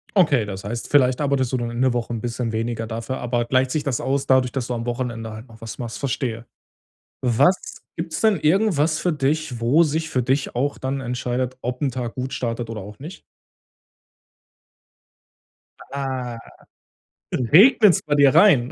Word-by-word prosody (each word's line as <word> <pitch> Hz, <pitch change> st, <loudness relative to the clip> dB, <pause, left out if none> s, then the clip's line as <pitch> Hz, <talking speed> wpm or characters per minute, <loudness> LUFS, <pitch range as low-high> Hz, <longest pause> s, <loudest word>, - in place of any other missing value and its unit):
Okay, 145 Hz, -, +4 dB
das 95 Hz, -2 st, -7 dB
heißt, 115 Hz, +3 st, -5 dB
vielleicht 130 Hz, -1 st, +3 dB
arbeitest 135 Hz, -3 st, 0 dB
du -, -, +2 dB
dann 120 Hz, -1 st, -3 dB
in 120 Hz, +2 st, -3 dB
der 130 Hz, -2 st, +3 dB
Woche 120 Hz, -1 st, -2 dB
‘n 115 Hz, -, -4 dB
bisschen 120 Hz, -1 st, -3 dB
weniger, 115 Hz, 0 st, -3 dB
dafür 115 Hz, +3 st, -4 dB
aber 120 Hz, -1 st, -1 dB
gleicht 130 Hz, +1 st, +1 dB
sich 155 Hz, -, -1 dB
das 135 Hz, -5 st, -1 dB
aus 135 Hz, +1 st, -1 dB
dadurch, 130 Hz, -1 st, +3 dB
dass 130 Hz, -3 st, -3 dB
du 125 Hz, -, -2 dB
am 115 Hz, -1 st, -4 dB
Wochenende 120 Hz, -2 st, -4 dB
halt 110 Hz, +3 st, -10 dB
noch 110 Hz, -1 st, -17 dB
was 115 Hz, -1 st, -7 dB
machst, 115 Hz, -3 st, -6 dB
verstehe. 120 Hz, -4 st, -3 dB, 0.8 s
Was 130 Hz, +10 st, +1 dB
gibt's 165 Hz, -1 st, -4 dB
denn 220 Hz, -3 st, +3 dB
irgendwas 160 Hz, -3 st, +2 dB
für 180 Hz, -, 0 dB
dich, 145 Hz, -3 st, -1 dB
wo 130 Hz, +8 st, +4 dB
sich 160 Hz, +1 st, -1 dB
für 130 Hz, -, 0 dB
dich 135 Hz, +3 st, -1 dB
auch 140 Hz, +4 st, -1 dB
dann 135 Hz, +1 st, -3 dB
entscheidet, 125 Hz, 0 st, -3 dB
ob 125 Hz, +2 st, -4 dB
‘n 140 Hz, -, +1 dB
Tag 120 Hz, -1 st, -5 dB
gut 130 Hz, 0 st, -4 dB
startet 115 Hz, -1 st, -3 dB
oder 110 Hz, -2 st, -5 dB
auch 105 Hz, +2 st, -11 dB
nicht? 160 Hz, +7 st, -9 dB, 2.7 s
Ah, 130 Hz, -4 st, -4 dB, 1.0 s
regnet's 185 Hz, -, +5 dB
bei 145 Hz, -1 st, 0 dB
dir 140 Hz, -2 st, +5 dB
rein? 160 Hz, -9 st, +5 dB
130 Hz, 175 wpm, -22 LUFS, 120-145 Hz, 2.7 s, regnet's